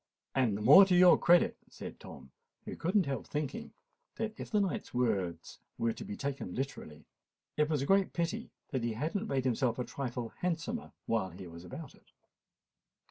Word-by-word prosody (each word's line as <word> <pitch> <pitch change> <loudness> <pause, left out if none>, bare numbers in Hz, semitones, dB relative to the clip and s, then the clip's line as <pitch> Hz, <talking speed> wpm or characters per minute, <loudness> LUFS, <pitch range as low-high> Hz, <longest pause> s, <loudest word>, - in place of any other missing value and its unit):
"And 120 -7 +2
the 105 - -5
more 190 - +10
to 185 -2 +2
your 180 0 +8
credit," 175 0 +4
said - - -9
Tom, 65 - -12 0.3
who - - -6
could 180 +5 -2
not 200 -4 +5
help 135 -1 -3
thinking 145 -2 -4 0.4
that 220 -1 -3
if - - -7
the 210 - +2
knight's 195 -9 -2
words 100 -9 -1 0.2
were 115 0 0
to - - -8
be 100 - -6
taken 140 -10 -4
literally, 80 - -5 0.5
it 150 0 +2
was 150 -4 0
a - - -1
great 195 +3 +3
pity 175 +7 -2 0.2
that 130 -4 -2
he 120 -1 -1
had 150 +9 -3
not 205 +2 -2
made 135 -8 -1
himself 125 -1 +1
a 125 - -1
trifle 125 -2 -4
handsomer 180 +7 -2
while 110 -5 0
he 90 +2 -10
was 85 0 -10
about 130 - -9
it. - - -25
135 Hz, 190 wpm, -32 LUFS, 115-175 Hz, 0.5 s, more